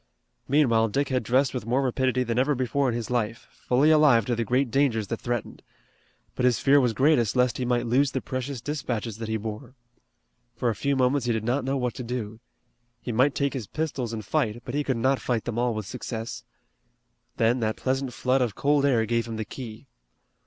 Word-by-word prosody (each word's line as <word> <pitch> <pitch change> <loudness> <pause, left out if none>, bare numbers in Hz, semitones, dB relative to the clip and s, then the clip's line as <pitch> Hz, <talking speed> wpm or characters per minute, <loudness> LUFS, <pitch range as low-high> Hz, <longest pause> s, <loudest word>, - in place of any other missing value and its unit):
Meanwhile 120 -6 +3
Dick 140 +6 -1
had 130 -1 +1
dressed 125 +3 +1
with 125 -4 -5
more 130 +4 +1
rapidity 130 0 +1
than 120 0 -1
ever 140 +3 +2
before 130 +2 0
in 115 - -1
his 120 0 -4
life, 115 -2 -2
fully 140 +5 +2
alive 150 -8 +5
to 120 - 0
the 115 - -1
great 125 +2 0
dangers 115 -6 +1
that 115 - -3
threatened. 120 -2 -4 0.7
But - - -3
his 125 -2 +4
fear 140 +1 +4
was 120 -3 +1
greatest 130 -4 +3
lest 125 0 +2
he 125 - -1
might 120 -1 +1
lose 130 +4 +3
the 130 - -2
precious 130 -1 -4
dispatches 120 -6 -3
that 115 - -4
he 110 - 0
bore. 110 +4 -7 0.8
For 125 - 0
a - - -5
few 140 +7 0
moments 130 0 +1
he 120 - +2
did 110 -1 -2
not 125 +4 0
know 135 +1 -1
what 125 -3 -1
to 125 - -6
do. 115 -3 -5 0.6
He 120 - -5
might 130 +5 +2
take 140 -1 0
his 125 -7 -5
pistols 140 -7 -3
and 110 -2 -5
fight, 120 -6 -1
but 125 - -6
he 145 +1 0
could 130 -4 -1
not 130 +3 +2
fight 120 -3 -1
them 120 -1 -2
all 120 -2 +1
with 110 -1 -4
success. 115 0 -6 0.9
Then 115 +3 +2
that 110 -2 -1
pleasant 135 0 -1
flood 130 +1 +1
of 120 -5 -1
cold 145 0 +2
air 115 -5 +2
gave 115 0 0
him 115 - -5
the 110 0 -3
key. 115 +1 -9
125 Hz, 215 wpm, -26 LUFS, 115-135 Hz, 0.9 s, alive